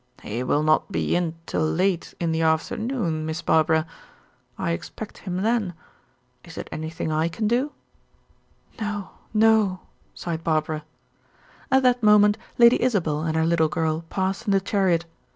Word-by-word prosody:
"He 115 +4 -4
will 145 +4 +1
not 155 +5 +2
be - - 0
in 170 -2 0
till - - -2
late 175 +3 0
in 170 -1 0
the 160 0 0
afternoon, 165 +2 0
Miss 160 +2 -4
Barbara. 160 0 +3 0.7
I - - -1
expect 145 - -6
him 185 0 -3
then. 215 -6 0 0.7
Is 165 -2 -12
it - - -5
anything 160 0 -4
I 155 +1 +1
can 195 +6 -2
do?" 250 +6 +1 1.1
"No, 210 -2 -4 0.2
no," 215 -4 +3 0.3
sighed 165 -2 -4
Barbara. 155 -1 0 0.9
At 265 0 +4
that 250 -1 +3
moment 210 0 +5 0.2
Lady 235 0 +6
Isabel 175 -12 +1
and 160 0 -1
her 160 - +2
little 165 -1 +2
girl 160 +1 -1
passed 190 +1 -2
in - - +2
the 195 - +4
chariot. 190 -4 +1
175 Hz, 150 wpm, -24 LUFS, 160-210 Hz, 1.1 s, Lady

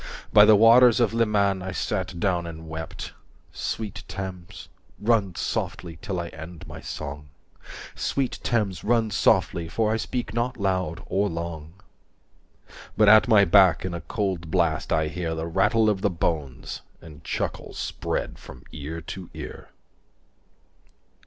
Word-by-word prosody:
By - - +9
the 110 - +7
waters 115 +3 +7
of 115 -3 +2
Leman 105 -4 +2
I 95 +1 -4
sat 95 -3 -3
down 90 -2 0
and 80 -1 -9
wept… 80 -1 -6 0.4
Sweet 105 -3 -4
Thames, 95 -2 -7 0.3
run 105 -5 +1
softly 85 -2 -3
till 95 -5 -3
I 85 -1 -4
end 80 +1 -10
my - - -9
song, 70 -1 -7 0.6
Sweet 135 -3 -2
Thames, 100 -8 -1
run 115 -1 +2
softly, 85 -3 +2
for 110 +3 +1
I - - +1
speak 115 -1 -4
not 120 +2 -1
loud 95 -3 -1
or 100 +1 0
long. 80 -2 -6 1.2
But 105 -1 +6
at 110 +3 +7
my 105 -4 +6
back 95 0 +5
in 90 - -3
a 85 - -4
cold 95 -6 -3
blast 80 -4 0
I 80 -1 +2
hear 85 +1 -3
185 - - -7 0.2
The 95 - -1
rattle 110 +2 +4
of 105 -3 +1
the 105 - +2
bones, 80 -6 -3 0.2
and 80 -2 -13
chuckle - - -4
spread - - -3
from 65 - -12
ear 80 +2 -6
to 90 +2 -8
ear. - - -8
95 Hz, 150 wpm, -25 LUFS, 80-105 Hz, 1.2 s, By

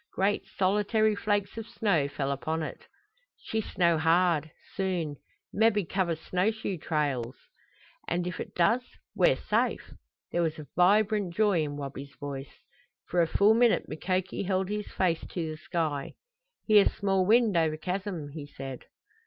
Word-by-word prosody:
Great 200 +2 +1
solitary 210 +3 +2
flakes 205 +1 -1
of 225 - -7
snow 200 -11 +1
fell 140 -1 -2
upon 160 +4 -2
it. - - -7 0.5
"She 220 - -3
snow 170 -5 +1
hard 165 -1 +3 0.3
soon. 175 -7 -1 0.4
Mebby 210 -2 +3
cover 175 -1 0
snow 180 +5 0
shoe 215 -5 -4
trails!" 140 -6 -1 0.7
"And 175 +1 -1
if 180 -1 -4
it - - -7
does 205 +9 +3 0.3
we're - - +4
safe!" - - -1 0.4
There 175 - +1
was 160 -2 -1
a 155 - -8
vibrant 200 0 +3
joy 205 -6 +3
in 145 -1 -3
Wabi's 140 0 -7
voice. 140 -2 -7 0.5
For 175 - +2
a 165 - +3
full 205 +6 +4
minute 235 0 +3
Mukoki 185 +4 -2
held 190 -1 0
his 210 0 -3
face 175 -3 0
to 165 -3 -4
the 155 - -7
sky. 155 -3 -3 0.5
"Hear 210 -2 +6
small 195 -2 +1
wind 220 +1 +4
over 160 -2 +2
chasm," 180 -2 -4
he 145 0 -8
said. 135 -2 -8
180 Hz, 155 wpm, -28 LUFS, 155-205 Hz, 0.7 s, Hear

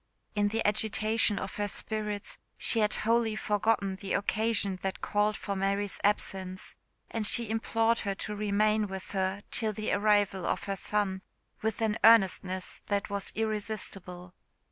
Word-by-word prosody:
In 205 -1 +2
the 225 +2 -1
agitation 215 0 +2
of 190 0 -5
her 205 0 0
spirits 210 0 -3 0.2
she 230 - +2
had 210 -1 +3
wholly 225 0 +2
forgotten 205 -2 +1
the 195 0 -4
occasion 205 -2 0
that 190 -1 -3
called 210 0 +1
for 200 - -3
Mary's 200 +1 -1
absence, 190 -2 -1 0.4
and 220 -2 0
she 235 -1 +1
implored 225 +1 +1
her 200 -1 -2
to 210 +2 -4
remain 210 +1 +2
with 190 -1 -7
her 190 +1 -1
till 220 -2 0
the 215 +1 -2
arrival 205 -2 +2
of - - -1
her 195 - -2
son 195 -1 0 0.4
with 220 +1 -1
an 220 0 0
earnestness 190 -4 +4
that 200 0 -1
was 200 -1 -2
irresistible. 200 -5 -3
205 Hz, 150 wpm, -30 LUFS, 195-215 Hz, 0.4 s, earnestness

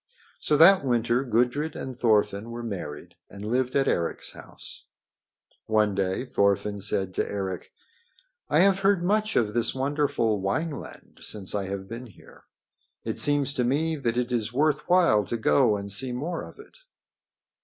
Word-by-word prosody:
So 150 - +1
that 185 +3 +7
winter 120 -1 +1
Gudrid 125 +5 0
and 130 -1 -6
Thorfinn 110 -2 +1
were 120 0 -6
married 90 -10 -6 0.2
and 100 +1 -9
lived 125 +3 -1
at 135 -1 +2
Eric's 85 -1 -1
house. - - -12 0.8
One 110 -2 +2
day 95 +4 -1
Thorfinn 100 -3 0
said 95 -1 -1
to - - -2
Eric: 95 -3 -4 0.8
"I - - +4
have 195 0 +4
heard 195 -2 +2
much 215 +3 +1
of 105 -3 +1
this 120 +2 +1
wonderful 135 -6 0
Wineland 140 - -4
since 100 -3 -3
I 100 -2 -1
have 95 0 -5
been 115 +3 -8
here. 105 - -18 0.6
It - - -3
seems 145 -1 +2
to 125 - 0
me 155 +6 0
that 120 -5 -2
it 125 0 -1
is 115 -3 -1
worth 150 +3 0
while 170 - +4
to 120 - -3
go 105 +1 +3
and 100 0 -7
see 125 +6 0
more 155 +8 -3
of - - -11
it." 425 +3 -15
120 Hz, 165 wpm, -26 LUFS, 100-145 Hz, 0.8 s, that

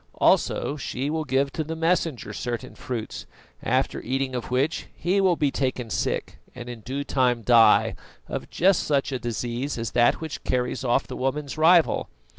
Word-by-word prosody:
Also 150 - +2
she 135 +1 -3
will 160 0 -2
give 135 +1 +1
to 160 - -2
the 160 +2 -5
Messenger 165 -4 0
certain 120 +1 -4
fruits, 120 -4 -6 0.3
after - - 0
eating 135 0 -2
of 125 -2 -4
which 135 +6 0
he 190 +3 +1
will 185 -2 +4
be 145 -3 +1
taken 130 -4 -2
sick - - -2 0.2
and 120 -1 -8
in 120 -2 -7
due 135 +6 -4
time 125 -4 +1
die, 115 0 +5 0.3
of - - -5
just 185 +1 +3
such 140 -2 0
a 130 - -2
disease 120 +3 -3
as 115 -1 -3
that 120 0 +3
which 160 -2 -6
carries 125 +1 -1
off 125 +2 +2
the - - -7
woman's 135 +2 -2
rival. 165 +1 +4
135 Hz, 175 wpm, -25 LUFS, 125-155 Hz, 0.3 s, die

